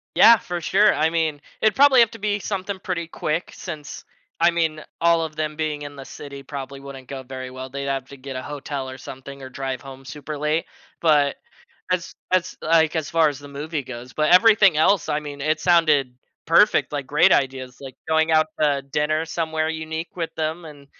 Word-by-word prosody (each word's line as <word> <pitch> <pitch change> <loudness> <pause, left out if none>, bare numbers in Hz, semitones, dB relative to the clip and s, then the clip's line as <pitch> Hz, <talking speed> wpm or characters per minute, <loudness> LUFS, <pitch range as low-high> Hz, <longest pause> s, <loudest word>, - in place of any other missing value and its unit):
Yeah, 230 +1 +8
for 175 -3 -5
sure. 210 +5 +4
I 155 +1 +2
mean, 160 -3 -1 0.2
it'd 215 -2 +3
probably 270 -1 +7
have 230 -2 +4
to 230 - -10
be 205 0 0
something 195 -1 -4
pretty 180 -3 -3
quick 160 +1 -3
since 155 -5 -8 0.4
I 170 - +7
mean, 160 -2 -1 0.2
all 170 0 +4
of 155 -1 -6
them 155 0 -2
being 150 -1 -3
in 145 0 -8
the 135 - -8
city 140 +1 -9
probably 140 0 -7
wouldn't 135 -2 -10
go 135 0 -6
very 130 0 -7
well, 130 +1 -7
they'd 140 +1 -5
have 135 -1 -2
to 140 - -11
get 135 0 -8
a 130 - -3
hotel 140 -1 -5
or 130 - -8
something 135 +1 -10
or 130 - -8
drive 130 -1 -4
home 135 -1 -11
super 150 +2 -7
late. 150 +3 0 0.3
But 145 -4 +3 0.6
as 180 -2 -1 0.2
as, 185 -1 +1
like, 160 0 +3
as 160 -2 -2
far 165 -1 +4
as 140 - -8
the 145 0 -11
movie 145 +2 -4
goes, 125 -1 -9
but 155 +1 +1
everything 205 -2 +6
else, 175 +4 +3
I 150 - 0
mean, 145 -1 -8
it 155 +2 +1
sounded 155 -7 +3 0.3
perfect, - - +4
like - - -3
great - - +4
ideas, 130 -2 0
like 135 -2 -9
going 160 0 +2
out 155 0 +4
to 145 -2 +2
dinner 150 +3 0
somewhere 160 -1 -2
unique 160 +1 -5
with 165 -2 -4
them 160 +2 -2
and, 145 -2 -13
155 Hz, 205 wpm, -23 LUFS, 140-165 Hz, 0.6 s, Yeah